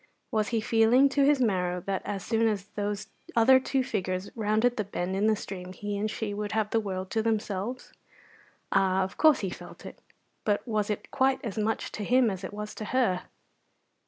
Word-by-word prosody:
Was 215 -3 +1
he 230 -2 0
feeling 230 +5 +4
to 280 +1 +2
his 290 -1 +4
marrow 180 -6 +1
that 195 +1 -2
as 195 -2 -4
soon 225 0 +2
as 205 -3 -1
those 205 0 -3 0.3
other 255 +3 +7
two 260 0 0
figures 185 -4 -3
rounded 220 +2 +2
the 215 - -1
bend 185 -1 -3
in 205 +3 +2
the 220 - +4
stream 185 -3 -7
he 205 +2 -4
and 210 +2 -1
she 210 -1 -3
would 210 0 -4
have 220 -1 0
the 225 - +3
world 190 -3 -4
to 225 - +1
themselves? 220 +1 -2 0.8
Ah, 190 -1 +3
of 190 - -6
course 310 -3 +5
he 190 -3 -2
felt - - -10
it, - - -10 0.4
but 205 +1 0
was 215 -2 0
it 210 - -4
quite 265 0 +2
as 215 - -4
much 220 +1 -1
to 210 - -5
him 245 +1 +3
as 190 -1 -6
it - - -5
was 210 +1 -6
to 215 - -6
her? 230 -7 +1
210 Hz, 205 wpm, -28 LUFS, 195-230 Hz, 0.8 s, other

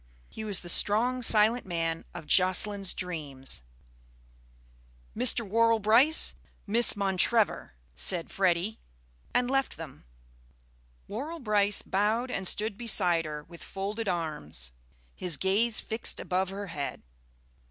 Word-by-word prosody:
He 220 - -8
was 205 -3 -1
the 175 - -10
strong, 230 +8 +2
silent 225 +1 +3
man 165 -2 -3
of 175 -3 -8
Jocelyn's 190 +3 +2
dreams. 145 - -3 1.5
"Mr. 235 -1 +3
Worrall 230 +2 +3
Brice, 230 +9 +5 0.3
Miss 230 +3 +5
Montrevor," 200 - +1 0.2
said 175 -3 +1
Freddy, 190 +2 0 0.5
and 245 0 +1
left 270 0 -1
them. 155 - -10 1.0
Worrall 295 +10 -6
Brice 210 -5 +1
bowed 220 +6 0
and 190 -5 -3
stood 210 +2 -2
beside 180 -8 +1
her 150 -1 -6
with 170 +2 -13
folded 205 +3 -5
arms, 150 - -4 0.4
his 175 -5 -1
gaze 215 - +1
fixed 220 +1 -3
above 185 0 -1
her 200 +1 -6
head. 150 -6 -6
200 Hz, 120 wpm, -28 LUFS, 175-225 Hz, 1.5 s, Brice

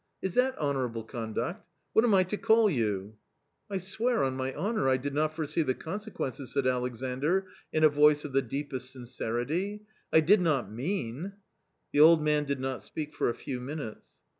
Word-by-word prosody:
Is 190 - -3
that 260 +3 +2
honourable 130 -6 -1
conduct? 115 - -4 0.3
What 220 - +5
am 225 -4 +4
I 185 - +5
to 185 +3 -3
call 220 -1 +4
you? 105 - -1 0.2
" 145 - -48
" - - -49
I 195 - -1
swear 220 +6 0
on 130 -1 0
my 130 0 -2
honour 200 - 0
I 130 - +4
did 140 +2 -4
not 155 +1 0
foresee 155 0 -1
the 130 -4 0
consequences," 160 - -5
said 140 -2 +1
Alexandr, 130 +8 0 0.3
in 155 - +1
a - - +10
voice 150 0 +4
of 145 - -6
the 135 - +4
deepest 130 0 -4
sincerity; 135 - -3
" - - -38
I 160 - +6
did 190 +6 +5
not 140 - +1
mean 145 - -3 0.3
" - - -49
The - - +2
old 160 +2 +8
man 150 -1 +2
did 140 -1 -2
not 130 0 -3
speak 150 -1 -6
for - - +1
a 120 - -2
few 130 0 -5
minutes. 130 -3 -6
145 Hz, 200 wpm, -29 LUFS, 130-180 Hz, 0.3 s, a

